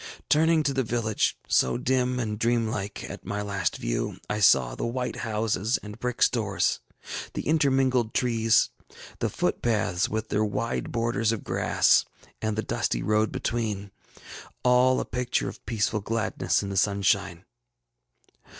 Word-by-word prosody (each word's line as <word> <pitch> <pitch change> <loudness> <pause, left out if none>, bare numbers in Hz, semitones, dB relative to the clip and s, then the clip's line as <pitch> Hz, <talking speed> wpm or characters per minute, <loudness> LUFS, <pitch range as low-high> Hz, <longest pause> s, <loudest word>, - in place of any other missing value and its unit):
Turning 160 +1 +4
to 140 - 0
the 135 - +1
village, 110 -3 0
so 65 - +2
dim 125 0 0
and 105 -3 -3
dream 115 -1 +2
like 100 -3 -4
at - - -8
my 100 0 -3
last 100 -1 -1
view, - - -2
I 105 - -2
saw 65 - +5
the - - -5
white 125 +1 -2
houses 110 0 0
and 105 0 -9
brick 125 -1 0
stores, - - +1 0.6
the - - -2
intermingled 135 -6 +2
trees, 115 -2 +3 0.5
the - - 0
footpaths 95 -6 0
with 110 +1 -3
their 105 +1 +1
wide 110 +3 -2
borders 115 -1 0
of 115 - -3
grass, - - +3 0.4
and 110 -1 -1
the 110 - 0
dusty - - -1
road 110 +1 +2
between; 105 -4 -2 0.7
all 125 +1 +4
a - - -2
picture 125 0 -1
of - - -8
peaceful 110 -1 0
gladness 115 0 0
in 100 - -4
the 100 - -3
sunshine. 100 -2 +1
110 Hz, 150 wpm, -26 LUFS, 105-125 Hz, 0.7 s, saw